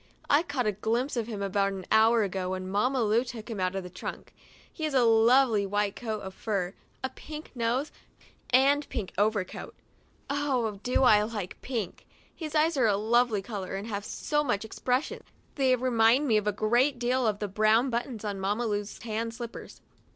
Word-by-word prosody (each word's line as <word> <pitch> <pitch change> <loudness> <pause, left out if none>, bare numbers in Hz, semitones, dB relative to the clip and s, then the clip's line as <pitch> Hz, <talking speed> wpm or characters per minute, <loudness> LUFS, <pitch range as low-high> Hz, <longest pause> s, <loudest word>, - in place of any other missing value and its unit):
I 290 - +6
caught 285 -7 -2
a 210 - +2
glimpse 230 +7 -1
of 230 -2 -2
him 210 -4 -4
about 195 0 +1
an 190 -1 -7
hour 220 +1 +5
ago, 190 -2 -2
when 185 0 -4
Mamma 240 +6 +1
Lu 220 +3 +3
took 240 -2 -8
him 215 - -4
out 185 0 0
of 195 - -3
the 180 - -8
trunk. 180 - -7 0.4
He 315 - -7
has 300 -3 -2
a 255 - +5
lovely 230 0 +5
white 205 0 -1
coat 220 -3 -4
of 190 0 -7
fur, 195 -3 -2 0.3
a 260 - -1
pink 305 +2 -9
nose 245 +4 -1 0.6
and 275 +3 +4
pink 210 -6 -4
overcoat 205 -2 -1 0.3
— - - -36
I 260 -7 -1
do 250 +3 +1
like 210 -5 +2
pink. 230 -8 -4 0.3
His 315 -2 -6
eyes 310 +1 +3
are 245 -4 +4
a 200 -2 +2
lovely 225 -1 +2
color 195 -3 -5
and 195 +2 -4
have 200 -2 -3
so 295 +7 -1
much 220 -6 -1
expres 250 +4 0
sion; - - -8 0.3
they 265 -3 +3
remind 250 +2 +3
me 220 -4 +4
a 210 0 0
great 240 +7 +2
deal 245 0 +1
of 210 -2 0
the 210 - -3
brown 215 +6 +3
buttons 235 -2 -3
on 200 -2 -3
Mamma 205 +5 -1
Lu's 205 -1 -3
tan 225 0 -3
slippers. 230 0 -9
225 Hz, 195 wpm, -28 LUFS, 205-255 Hz, 0.6 s, I